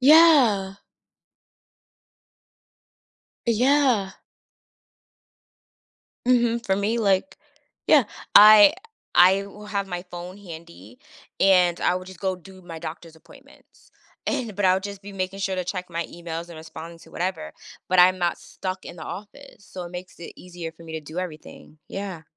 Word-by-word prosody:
Yeah. 260 -10 +6 2.7
Yeah. 245 -4 +2 2.1
Mhm, 235 -2 +2
for 190 - +1
me, 210 +4 0
like 200 +4 +1 0.5
yeah, 290 -5 +6 0.3
I 215 +7 +9 0.4
I 190 +3 +5
will 210 +1 -12
have 200 -1 -2
my 180 -2 -5
phone 175 +2 -8
handy, 160 - -12 0.4
and 180 -3 +4
I - - +2
would 185 0 -5
just 190 -3 -12
go 190 -2 -1
do 185 +2 -15
my 165 -2 -9
doctor's 160 +1 -9
appointments, 160 - -20 0.4
and 230 -5 -2
but 205 - -1
I 185 0 +5
would 190 - -2
just 200 0 -7
be 200 0 -10
making 190 0 -4
sure 195 -1 -1
to 185 -1 -3
check 180 0 -5
my 170 0 -3
emails 170 0 -7
and 170 - -11
responding 160 +1 -10
to - - -17
whatever, 180 -2 -4 0.4
but 185 0 +1
I'm 185 +1 +6
not 175 -1 0
stuck 185 0 -6
in 175 - -9
the 160 - -10
office, 205 +5 -10
so, 185 -1 -8
it 175 - -9
makes 180 +1 -9
it 170 - -9
easier 175 -2 -8
for 165 - -17
me 165 -1 -10
to 160 - -4
do 155 +3 -8
everything, 155 -3 -8
yeah. 195 -5 -6
185 Hz, 155 wpm, -24 LUFS, 170-205 Hz, 2.7 s, I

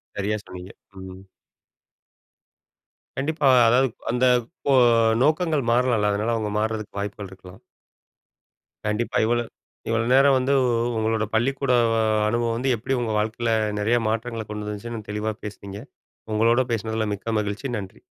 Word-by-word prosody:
சரியா 105 +2 -1
சொன்னீங்க. 90 +1 -10 0.3
ம். 95 +1 -11 1.9
கண்டிப்பா 150 +1 0 0.2
அதாவது 125 +2 +3 0.2
அந்த 125 +1 +1 0.4
கோ 140 - +4 0.5
நோக்கங்கள் 155 -2 +1
மாறலாம்ல! 120 -4 +2
அதனால 110 +3 -1
அவங்க 110 -2 -2
மார்றதுக்கு 110 -2 -3
வாய்ப்புகள் 100 -1 -5
இருக்கலாம். 95 0 -14 1.2
கண்டிப்பா 105 +3 -1
இவ்வளோ 120 +1 +1 0.5
இவ்வளோ 115 0 +1
நேரம் 135 0 +5
வந்து 130 +2 +1
உ - - +1 0.3
உங்களோட 110 0 0
பள்ளிக்கூட 135 +3 0 0.6
அனுபவம் 115 +1 0
வந்து 130 +1 +1
எப்படி 130 +5 -2
உங்க 115 -2 -2
வாழ்க்கையில 110 +2 -1 0.3
நிறைய 115 +4 +2
மாற்றங்களை 115 0 -3
கொண்டு 105 0 -5
வந்துச்சுன்னு 110 +1 -7
தெளிவா 105 +1 -2
பேசினீங்க. 100 0 -8 0.5
உங்களோடு 120 +3 +2
பேசினதுல 110 0 -2
மிக்க 110 +3 -4
மகிழ்ச்சி 105 +5 -4
நன்றி. 95 -2 -10
115 Hz, 125 wpm, -23 LUFS, 105-125 Hz, 1.9 s, நேரம்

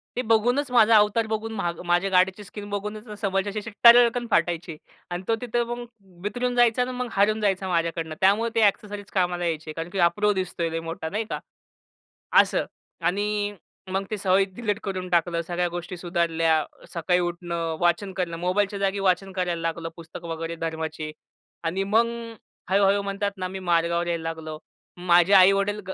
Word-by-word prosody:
ते 250 - 0
बघूनच, 245 +5 +2
माझा 230 -2 +6
अवतार 210 +2 +3
बघून, 220 +1 -3
मा 175 -5 -1
माझ्या 175 +3 +2
गाडीची 190 +2 +2
स्किन 205 +1 -9
बघूनच 210 +1 -5
समोरच्याची 200 +2 -1
टरकन 240 0 +7
फाटायची. 170 -2 0 0.3
आणि 175 +2 -3
तो 225 - +2
तिथे 240 -1 0
मग 240 +1 -5 0.4
बिथरून 245 +4 -2
जायचा 240 0 +4
आणि 250 - -1
मग 250 0 -3
हरून 215 +2 +2
जायचा 195 -2 0
माझ्याकडनं, 165 -2 -1
त्यामुळे 210 +5 +3
ते 225 - +3
एक्सेसरीज 205 0 -4
कामाला 175 -2 0
यायचे 160 -1 -3
कारण 165 +2 -5
की 190 - -4
"हा 170 - +6
प्रो 210 0 +2
दिसतोय 185 -3 -2
लय 165 0 -3
मोठा," 165 -1 -5
नाही 215 +4 -2
का? - - -3 1.0
असं - - +1 0.4
आणि 205 +2 0 0.4
मग 195 +1 -1
ते 215 - -1
सवयी 190 0 +3
डिलीट 210 -3 -2
करून 185 -2 -4
टाकलं, 170 -1 +1
सगळ्या 175 +1 -1
गोष्टी 175 +1 -6
सुधारल्या. 165 -3 +1 0.3
सकाळी 180 +1 +1
उठणं, 170 -2 -3
वाचन 175 +3 +1
करणं, 175 -3 -2
मोबाईलच्या 195 +3 0
जागी 195 0 0
वाचन 190 0 +1
करायला 180 -3 -2
लागलो, 165 0 -2
पुस्तकं 170 0 -10
वगैरे 165 0 -4
धर्माची. 160 -1 -4 0.5
आणि 190 +4 -1
मग 225 +4 +3 0.6
हळू-हळू 200 +1 +3
म्हणतात 200 +1 -2
ना, 185 -1 -3
मी 190 +1 -6
मार्गावर 170 -1 +1
यायला 170 -1 -2
लागलो. 160 -1 -5 0.5
माझे 175 +2 +5
आई-वडील, 195 +2 +5
190 Hz, 165 wpm, -25 LUFS, 170-210 Hz, 1.0 s, टरकन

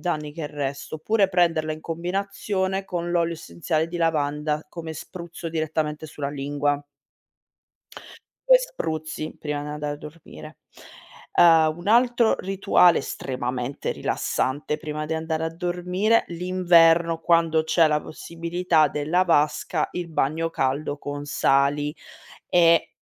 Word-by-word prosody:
danni 150 -4 -3
che 165 - -7
il 145 - -4
resto, 140 0 -5
oppure 195 +6 +1
prenderla 165 -4 +1
in 155 - -8
combinazione 190 +2 -2
con 175 -2 -4
l'olio 170 -1 +1
essenziale 155 - -2
di 175 - -5
lavanda 150 -1 0
come 165 0 -7
spruzzo 170 +1 -8
direttamente 155 -1 -2
sulla 145 -2 -5
lingua. 145 0 -1 1.7
2 - - +8
spruzzi 155 - -5
prima 150 -1 -3
di 145 - -6
andare 150 0 -4
a - - -10
dormire. 155 0 -12 0.8
Uhm, 160 -2 +5
un 175 - -10
altro 240 0 +4
rituale 185 -2 +3
estremamente 125 -1 -4
rilassante 145 +3 -2
prima 155 -1 -5
di 160 - -3
andare 160 0 -2
a 160 0 -4
dormire, 180 +6 +1
l'inverno 170 -2 +3
quando 165 -1 +3
c'è 160 +1 +4
la 150 -1 +1
possibilità 170 0 0
della 155 +6 0
vasca, 155 -1 +1
il 175 -1 -4
bagno 160 +1 0
caldo 140 0 -1
con 145 0 -6
sali 145 +1 +1 0.5
e, 170 -2 +4
160 Hz, 125 wpm, -24 LUFS, 150-175 Hz, 1.7 s, 2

